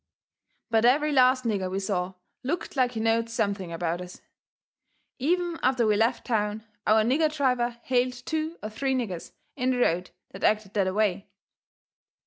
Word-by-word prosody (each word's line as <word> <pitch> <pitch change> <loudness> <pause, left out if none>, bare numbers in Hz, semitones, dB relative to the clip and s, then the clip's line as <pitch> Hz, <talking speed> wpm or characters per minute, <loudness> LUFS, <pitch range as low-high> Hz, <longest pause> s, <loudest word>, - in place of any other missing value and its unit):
But 225 -1 +3
every 290 +5 +4
last 255 -1 +4
nigger 200 -5 -1
we 190 - -3
saw 190 -2 -2 0.3
looked 310 +6 -3
like 250 -2 +2
he 225 - -3
knowed 225 +1 +1
something 200 -5 -2
about 170 +1 -2
us. 180 0 -9 1.0
Even 345 +4 0
after 255 -2 +2
we 215 -1 +3
left 230 +4 +1
town 215 -2 -1 0.2
our 215 +1 +5
nigger 300 +7 +2
driver 250 -5 0
hailed 250 0 +1
two 315 +6 -3
or 215 - -3
three 265 +4 -1
niggers 200 -9 -4 0.2
in 250 +1 0
the 255 - +1
road 180 -6 +1 0.2
that 195 - -10
acted 210 -2 +1
that 195 -3 +1
away. 200 0 0
230 Hz, 160 wpm, -27 LUFS, 200-255 Hz, 1.0 s, our